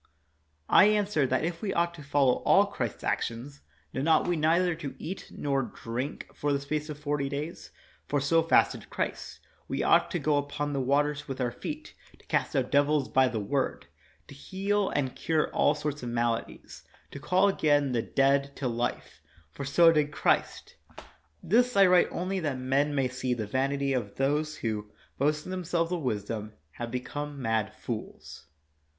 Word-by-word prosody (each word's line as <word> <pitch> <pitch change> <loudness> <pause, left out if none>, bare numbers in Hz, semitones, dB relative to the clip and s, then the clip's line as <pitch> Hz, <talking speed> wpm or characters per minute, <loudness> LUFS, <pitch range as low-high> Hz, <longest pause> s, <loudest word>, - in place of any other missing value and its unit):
I - - +7
answer 205 -9 +2
that 130 +3 0
if 170 0 -4
we 200 -3 -2
ought 170 0 +1
to 170 - -11
follow 140 -3 +2
all - - +5
Christ's - - -4
actions 125 +5 -3 0.3
then 135 +4 -2
ought 160 +1 +4
we 175 - +1
neither 170 +3 +2
to 155 -4 -7
eat 190 +4 -6
nor 140 -2 -1
drink 125 +2 -5
for 145 - -1
the 140 - +1
space 150 +2 -3
of 150 - -5
forty 145 -2 -2
days, 150 +4 -5 0.4
for 145 - +1
so 165 +4 +3
fasted 165 - +2
Christ; - - -4 0.3
we - - -2
ought - - +4
to 180 - -1
go 150 -2 +1
upon 145 +1 -2
the 135 - 0
waters 145 +3 +1
with 135 -1 -5
our 125 -2 0
feet; 300 - -7 0.2
to - - -24
cast - - -1
out 130 -2 0
devils 145 -1 +2
by 130 -1 +4
our 120 - -3
word; 130 +6 -2 0.4
to - - -11
heal 195 +7 -1
and 135 -3 -1
cure 160 -1 0
all - - +3
sorts 150 -1 -4
of 120 - -4
maladies; 120 -1 -3 0.3
to 140 - -8
call 185 +6 +3
again 145 -7 +2
the 120 -2 +1
dead 140 +3 +1
to 135 - -2
life; 120 0 -3 0.3
for 140 - -7
so 165 +5 +6
did 150 -2 +1
Christ. - - 0 0.7
This 245 +5 +2
I 195 - +8
write 180 -1 +5
only 185 +2 -2
that 150 -6 -2
men 135 +3 0
may 135 -2 +2
see 125 0 -2
the 110 -3 -3
vanity 135 +4 0
of 115 -6 -3
those 150 +3 0
who, 105 -2 -3 0.3
boasting 150 +5 0
them 185 -1 -3
selves 170 0 0
of 175 -2 -1
wisdom, 110 -3 -3 0.2
have 120 +8 -6
become 145 +4 -5
mad 115 -4 -1
fools. - - -7
145 Hz, 180 wpm, -28 LUFS, 130-160 Hz, 0.7 s, I